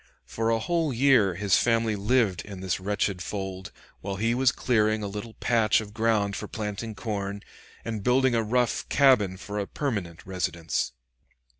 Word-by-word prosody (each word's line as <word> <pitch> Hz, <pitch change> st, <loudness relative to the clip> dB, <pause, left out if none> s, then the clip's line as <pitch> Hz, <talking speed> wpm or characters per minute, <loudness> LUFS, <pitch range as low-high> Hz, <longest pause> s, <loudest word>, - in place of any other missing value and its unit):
For 115 Hz, 0 st, -2 dB
a 115 Hz, -, +3 dB
whole 165 Hz, +5 st, 0 dB
year 120 Hz, -7 st, +4 dB
his 100 Hz, 0 st, +2 dB
family 115 Hz, -2 st, +2 dB
lived 105 Hz, -2 st, +1 dB
in 100 Hz, -3 st, -9 dB
this 95 Hz, -1 st, -2 dB
wretched 100 Hz, -1 st, -1 dB
fold, 95 Hz, -1 st, -5 dB, 0.3 s
while 100 Hz, 0 st, -4 dB
he 115 Hz, +4 st, +1 dB
was 130 Hz, +1 st, +3 dB
clearing 110 Hz, -3 st, +1 dB
a -, -, -2 dB
little 105 Hz, +3 st, -7 dB
patch 115 Hz, -3 st, +2 dB
of 105 Hz, -2 st, -8 dB
ground 110 Hz, -3 st, +1 dB
for -, -, -5 dB
planting 110 Hz, +1 st, -5 dB
corn, 100 Hz, -2 st, -4 dB, 0.4 s
and 110 Hz, -2 st, -3 dB
building 130 Hz, +1 st, +3 dB
a 115 Hz, -, +2 dB
rough 120 Hz, +2 st, 0 dB
cabin 120 Hz, -10 st, +4 dB
for 105 Hz, +2 st, -5 dB
a 100 Hz, -, -3 dB
permanent 100 Hz, -, -4 dB
residence. 85 Hz, -7 st, -2 dB
105 Hz, 165 wpm, -26 LUFS, 100-115 Hz, 0.4 s, year